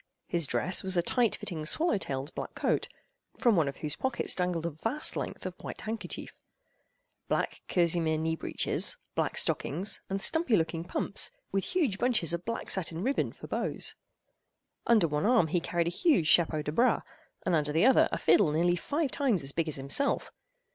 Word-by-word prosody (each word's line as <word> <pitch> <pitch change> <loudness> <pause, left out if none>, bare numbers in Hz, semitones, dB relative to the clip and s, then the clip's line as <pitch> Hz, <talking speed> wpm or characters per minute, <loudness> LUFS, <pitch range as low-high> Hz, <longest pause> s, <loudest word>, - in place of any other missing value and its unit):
His 170 -4 -1
dress 185 - +1
was 190 -1 -1
a 175 - +3
tight 240 +3 +2
fitting 160 -5 -6
swallow 315 - +2
tailed 135 -2 -4
black - - -6
coat - - 0 0.5
(from 235 -3 +3
one 160 -5 +2
of 140 - -5
whose 150 - -2
pockets 265 -2 0
dangled 180 -2 -1
a 170 - -1
vast 225 - -1
length - - -5
of - - -4
white - - -7
handkerchief), 220 +1 -6 0.9
black - - -1
kerseymere 170 -2 +2
knee 160 +1 -1
breeches, - - -1 0.2
black - - -1
stockings, 190 +8 0
and 195 +1 -1
stumpy 320 - +4
looking 165 0 -2
pumps, 175 - -1 0.2
with 195 -1 -1
huge 305 - 0
bunches 230 - +2
of 170 +1 -4
black 230 0 -3
satin 175 -2 -1
ribbon 270 +4 0
for - - -12
bows. - - -2 0.9
Under 220 -7 +4
one 150 +4 0
arm 230 -10 +4
he 175 - +1
carried 170 0 -1
a 170 - -1
huge 275 - +2
chapeau 155 -1 +3
de 150 - -3
bras, 240 +11 +2 0.4
and 185 - +1
under 150 -2 +1
the 165 +7 +3
other 265 -1 +5
a - - -1
fiddle 180 -8 +4
nearly 175 +3 +2
five 290 - -2
times 240 - 0
as 135 - -2
big 165 +2 -1
as 155 - -2
himself. 140 - +1
175 Hz, 185 wpm, -29 LUFS, 160-230 Hz, 0.9 s, other